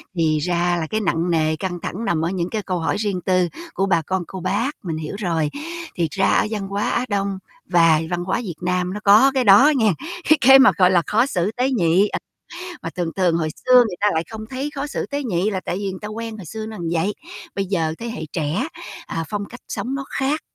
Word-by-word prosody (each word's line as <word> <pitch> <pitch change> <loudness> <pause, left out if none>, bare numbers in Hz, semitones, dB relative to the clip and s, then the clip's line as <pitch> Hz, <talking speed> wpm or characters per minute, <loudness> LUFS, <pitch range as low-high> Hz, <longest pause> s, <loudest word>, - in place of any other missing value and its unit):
thì 155 -2 +2
ra 175 +1 +1
là 160 - -3
cái 215 0 -1
nặng 175 -2 0
nề, 155 -1 +2
căng 175 +1 -4
thẳng 225 +6 -4
nằm 160 -1 0
ở 170 - 0
những 180 -1 -2
cái 220 - -2
câu 185 -3 -2
hỏi 165 - -1
riêng 200 -4 -1
tư 185 -1 +2 0.3
của 195 - 0
bà 170 -4 +2
con 185 +3 -2
cô 190 - -7
bác, 205 +9 0
mình 165 -3 -3
hiểu 155 +5 -5
rồi. 165 -6 0 0.5
Thiệt 170 -2 +1
ra 195 +4 +1
ở - - +3
văn 205 -3 -3
hóa 200 +1 -1
Á 245 - 0
Đông 200 -2 -1 0.3
và 165 -2 +4
văn 175 0 -2
hóa 190 +5 -1
Việt 180 -7 -5
Nam 180 0 -1
nó 210 - -4
có 215 +7 +6
cái 260 - +2
đó 245 +8 +7
nghen 220 -5 +3 0.4
cái 310 - +7
cái 270 +2 +8
mà, 265 - +7
gọi 185 -2 +5
là, 175 -2 +4
khó 225 +4 +3
xử 200 -6 -1
tế 255 +2 +1
nhị, 185 -3 +3
à, - - -3 0.6
mà 165 - -4
thường 175 -2 -3
thường 180 -3 +2
hồi 160 -2 -1 0.2
xưa 255 - +5
người 220 -7 +4
ta 210 - +3
lại 160 +1 0
không 220 -1 -7
thấy 270 +3 -3
khó 280 +1 -3
xử 290 - -4
tế 285 0 -3
nhị 195 -2 0
là 190 -3 -2
tại 175 - -2
vì 200 -1 -2
người 185 - -7
ta 210 - -4
quen 225 +1 -6
hồi 200 - -9
xưa 220 +6 -6
nó 220 0 -7 0.2
vậy, 175 +5 0 0.4
bây 195 - -1
giờ 165 -5 0
thế 235 - -5
hệ 225 -8 -5
trẻ, 155 +2 -1 0.4
à, 165 0 -3
phong 205 -1 -3
cách 245 +4 -11
sống 255 +3 -3
nó 275 0 -3
khác, 280 +4 0
190 Hz, 250 wpm, -21 LUFS, 170-220 Hz, 0.6 s, cái